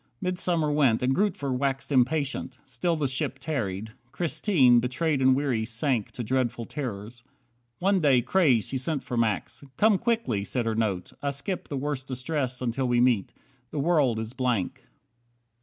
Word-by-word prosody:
Midsummer 180 -4 0
went, 135 -6 +3
And 130 +1 +2
Grootver 155 -8 0
waxed 135 +2 -2
impatient. 135 0 +1
Still 135 +7 -1
the 150 -3 0
ship 130 0 -3
Tarried. 110 -9 -3 0.2
Christine, 155 - +3
betrayed 135 +4 0
and 130 0 +5
weary, 130 -5 0
sank 115 0 -1
To 120 - -5
dreadful 120 -1 -1
terrors. 120 -4 -6 0.5
One 195 +1 +2
day, 135 -7 +4
crazed, 130 - +3
she 135 - -1
sent 140 +1 -1
For 125 - -5
Max. 115 +2 -1
"Come 210 -3 +4
quickly," 225 - 0
said 120 +3 -2
her 115 - 0
note, 105 -5 -2
"I 145 - 0
skip 140 +7 -4
The 140 - -4
worst 135 -1 -3
distress 130 0 -2
until 125 +2 -1
we 120 0 +2
meet. 120 -6 +2 0.4
The - - -7
world 140 -6 +2
is 110 +1 -4
blank." 125 -8 -2
130 Hz, 160 wpm, -27 LUFS, 120-150 Hz, 0.5 s, and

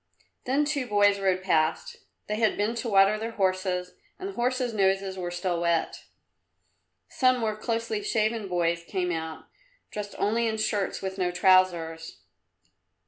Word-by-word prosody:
Then 275 +4 +2
two 285 -4 -1
boys 205 -2 +3
rode 185 -1 +1
past. 160 -4 0 0.3
They 210 - -2
had 220 -1 +2
been 210 +3 0
to 235 0 -3
water 200 +1 +4
their 225 +1 -4
horses 185 -2 -1 0.2
and 380 - -5
the - - -7
horses' 250 -2 -1
noses 195 -1 +1
were 180 -2 -4
still 175 0 -2
wet. 170 -1 -1 1.0
Some 255 -1 +2
more 220 -3 -1
closely 230 - -2
shaven 220 - 0
boys 170 -2 0
came 180 0 -2
out, 160 -1 -5 0.5
dressed 205 -1 -6
only 230 +3 +1
in 220 0 -1
shirts 210 -3 -1
with 190 0 -4
no 180 -1 +1
trousers. 175 -3 +2
195 Hz, 150 wpm, -27 LUFS, 180-225 Hz, 1.0 s, water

